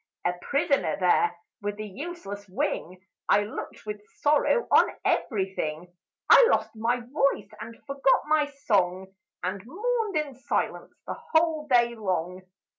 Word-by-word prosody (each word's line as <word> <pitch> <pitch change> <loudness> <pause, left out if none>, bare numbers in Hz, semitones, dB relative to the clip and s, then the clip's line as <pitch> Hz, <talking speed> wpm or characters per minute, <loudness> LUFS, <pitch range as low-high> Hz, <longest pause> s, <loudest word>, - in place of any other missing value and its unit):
"A - - +2
prisoner 280 - +1
there, 175 -1 +3 0.2
with 205 0 -4
a - - -3
useless 205 - -7
wing, 185 0 -3 0.2
I 205 - +5
looked 210 - -7
with 210 -1 -5
sorrow 300 +11 +2
on - - +6 0.2
every 195 -6 0
thing; 165 +2 -4 0.3
I - - +8
lost - - +1
my 235 +3 0
voice, 275 +3 0
and 230 +1 -8
forgot 275 -1 +2
my 305 -1 +2
song, 190 -9 0 0.3
And 185 +2 -2
mourned 425 - -1
in 300 -3 -2
silence, 260 +3 -2
the - - -6
whole 320 -2 +2
day 240 -3 +4
long. 185 -4 -2
235 Hz, 140 wpm, -27 LUFS, 190-295 Hz, 0.3 s, I